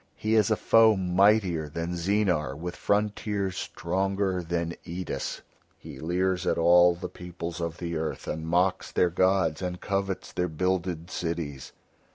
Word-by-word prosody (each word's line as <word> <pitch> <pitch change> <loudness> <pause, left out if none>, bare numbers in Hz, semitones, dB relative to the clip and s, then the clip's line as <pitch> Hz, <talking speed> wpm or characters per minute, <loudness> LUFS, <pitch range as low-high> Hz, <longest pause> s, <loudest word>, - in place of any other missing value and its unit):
He 110 +1 -1
is 110 -2 +4
a 110 - +3
foe 110 0 +5
mightier 95 -3 +2
than 85 +3 -4
Zeenar 85 -6 0
with 90 +2 -5
frontiers 100 -2 -1
stronger 95 +1 -1
than 85 0 -2
Eidis; 90 +1 -4 0.4
he - - -11
leers 90 +3 0
at - - +2
all 85 +1 +6
the 90 +1 -5
peoples 85 -1 -7
of 85 0 -3
the 85 -1 -4
earth 80 0 -4
and 80 +1 -4
mocks 90 +3 +1
their 90 - +2
gods 95 -2 +2
and 90 -1 -3
covets 95 -1 -3
their 90 - 0
builded 90 0 -2
cities. 80 -6 -4
90 Hz, 150 wpm, -27 LUFS, 85-95 Hz, 0.4 s, all